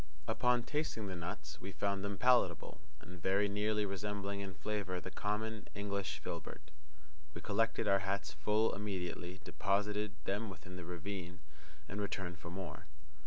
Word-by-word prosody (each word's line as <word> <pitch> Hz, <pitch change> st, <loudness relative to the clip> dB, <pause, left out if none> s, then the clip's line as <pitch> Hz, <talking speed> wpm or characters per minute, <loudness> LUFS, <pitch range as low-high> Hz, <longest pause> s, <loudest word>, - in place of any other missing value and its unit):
Upon 125 Hz, +1 st, +4 dB
tasting 150 Hz, -6 st, -1 dB
the 95 Hz, -2 st, -3 dB
nuts 75 Hz, -3 st, -4 dB
we 95 Hz, -, -4 dB
found 100 Hz, +1 st, 0 dB
them 100 Hz, 0 st, -1 dB
palatable, 125 Hz, +2 st, +4 dB, 0.2 s
and 90 Hz, -1 st, -10 dB
very 100 Hz, +4 st, +4 dB
nearly 105 Hz, +1 st, +2 dB
resembling 100 Hz, 0 st, -2 dB
in 95 Hz, -2 st, -4 dB
flavour 95 Hz, +1 st, -1 dB
the -, -, -6 dB
common 105 Hz, +1 st, -1 dB
English 100 Hz, -1 st, -1 dB
filbert. 75 Hz, -1 st, -6 dB, 0.6 s
We 85 Hz, -, -4 dB
collected 110 Hz, +2 st, +2 dB
our 100 Hz, -1 st, +6 dB
hats 95 Hz, -5 st, 0 dB
full 105 Hz, +9 st, +3 dB
immediately, 95 Hz, -2 st, -3 dB
deposited 105 Hz, +1 st, +1 dB
them 105 Hz, +5 st, 0 dB
within 90 Hz, 0 st, -8 dB
the 90 Hz, -1 st, -5 dB
ravine, 90 Hz, +1 st, -4 dB, 0.5 s
and 100 Hz, +2 st, -2 dB
returned 95 Hz, -3 st, -2 dB
for 85 Hz, -, -6 dB
more. 90 Hz, -1 st, -5 dB
100 Hz, 150 wpm, -37 LUFS, 90-105 Hz, 0.6 s, our